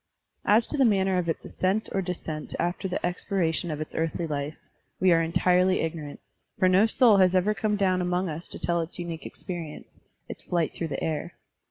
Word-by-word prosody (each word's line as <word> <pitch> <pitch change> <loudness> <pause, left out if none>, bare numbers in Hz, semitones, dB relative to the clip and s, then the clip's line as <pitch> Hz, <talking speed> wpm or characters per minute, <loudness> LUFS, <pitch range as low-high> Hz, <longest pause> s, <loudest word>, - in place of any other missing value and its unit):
As 220 +3 +5
to 300 - -4
the 275 - +5
manner 190 -5 +3
of 170 -1 -2
its 165 - -3
ascent 195 +4 -1
or 195 - 0
descent 165 -4 -5
after 175 +3 -1
the 180 - -2
expiration 175 -2 -1
of 150 -1 -3
its 155 - -6
earthly 165 +1 -1
life, 145 0 -3 0.4
we 185 0 +4
are 165 -1 +5
entirely 180 +2 +3
ignorant, 160 -3 -4 0.4
for 185 - +4
no 190 +4 +5
soul 225 -2 +5
has 185 -1 +4
ever 190 +3 +3
come 210 0 0
down 185 -2 +2
among 180 +1 0
us 160 +1 -5
to - - -5
tell 170 0 0
its 165 - -6
unique 170 -2 -5
experience, 170 -4 -8 0.3
its - - -7
flight 170 -3 -1
through 165 - -3
the 140 -3 -4
air. 155 -2 -2
180 Hz, 200 wpm, -27 LUFS, 165-190 Hz, 0.4 s, As